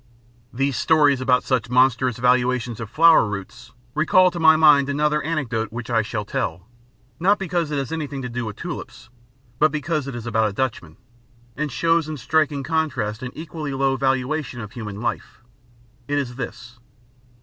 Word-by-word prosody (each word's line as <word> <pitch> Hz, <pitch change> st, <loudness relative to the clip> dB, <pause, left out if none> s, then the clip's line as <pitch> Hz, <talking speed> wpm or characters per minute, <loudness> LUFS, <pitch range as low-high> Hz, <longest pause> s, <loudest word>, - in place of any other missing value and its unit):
These 135 Hz, 0 st, -1 dB
stories 145 Hz, -3 st, +3 dB
about 125 Hz, -1 st, +2 dB
such 125 Hz, -3 st, -1 dB
monstrous 125 Hz, -1 st, +2 dB
valuations 125 Hz, -1 st, +1 dB
of 115 Hz, -3 st, -6 dB
flower 165 Hz, +3 st, +6 dB
roots 105 Hz, +4 st, -7 dB, 0.2 s
recall 180 Hz, +4 st, +4 dB
to 175 Hz, -, -6 dB
my 160 Hz, -1 st, +6 dB
mind 150 Hz, -3 st, +5 dB
another 150 Hz, +1 st, +1 dB
anecdote 125 Hz, -9 st, -2 dB
which 120 Hz, +1 st, -6 dB
I 115 Hz, -1 st, +3 dB
shall 105 Hz, -1 st, -4 dB
tell, 90 Hz, -2 st, -3 dB, 0.5 s
not 200 Hz, +4 st, +3 dB
because 175 Hz, -4 st, -2 dB
it 150 Hz, -, -2 dB
has 135 Hz, +1 st, -3 dB
anything 150 Hz, -4 st, -4 dB
to -, -, -3 dB
do 120 Hz, 0 st, -4 dB
with 105 Hz, -2 st, -6 dB
tulips, -, -, -8 dB, 0.5 s
but 155 Hz, 0 st, +4 dB
because 150 Hz, -1 st, -2 dB
it 135 Hz, -, -5 dB
is 120 Hz, -1 st, -7 dB
about 110 Hz, -2 st, +1 dB
a -, -, -8 dB
Dutchman, 100 Hz, -10 st, -3 dB, 0.6 s
and 150 Hz, 0 st, -3 dB
shows 165 Hz, +3 st, +1 dB
in 155 Hz, -, -4 dB
striking 145 Hz, +1 st, 0 dB
contrast 130 Hz, -9 st, -2 dB
an 130 Hz, -, -4 dB
equally 155 Hz, -3 st, -6 dB
low 135 Hz, 0 st, +1 dB
valuation 135 Hz, 0 st, -1 dB
of 105 Hz, -3 st, -7 dB
human 105 Hz, -4 st, -7 dB
life. 120 Hz, -, -4 dB, 0.6 s
It 145 Hz, -, -1 dB
is 125 Hz, -4 st, -3 dB
this. 120 Hz, -1 st, -8 dB
135 Hz, 170 wpm, -22 LUFS, 120-155 Hz, 0.6 s, flower